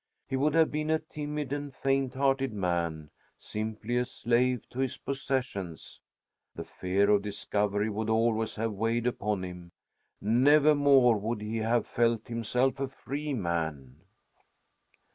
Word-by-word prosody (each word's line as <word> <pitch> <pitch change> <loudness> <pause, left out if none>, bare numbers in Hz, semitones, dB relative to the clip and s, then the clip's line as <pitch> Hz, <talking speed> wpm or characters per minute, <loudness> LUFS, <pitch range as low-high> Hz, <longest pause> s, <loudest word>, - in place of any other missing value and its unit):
He 135 - -2
would 145 +3 +1
have 160 -1 +4
been 150 +1 -2
a 160 - +4
timid 150 -2 -5
and 145 -1 -4
faint 135 -1 0
hearted 135 -1 +1
man; 85 -5 -2 0.3
simply 110 +2 -4
a 125 - +2
slave 125 0 0
to 125 - -7
his 135 -2 -1
possessions. 130 -11 -4 0.5
The - - -5
fear 100 +3 +1
of 105 -1 +4
discovery 105 0 -1
would 110 +1 -2
always 110 0 +1
have 115 +1 -1
weighed 115 +3 0
upon 105 -5 -1
him. 90 -1 -8 0.5
Nevermore 140 0 +5
would 110 +1 -3
he 110 +2 -3
have 115 +1 +1
felt 115 -1 0
himself 125 +3 0
a 135 - -1
free 140 +2 -4
man. 80 - -3
115 Hz, 140 wpm, -29 LUFS, 105-135 Hz, 0.5 s, Nevermore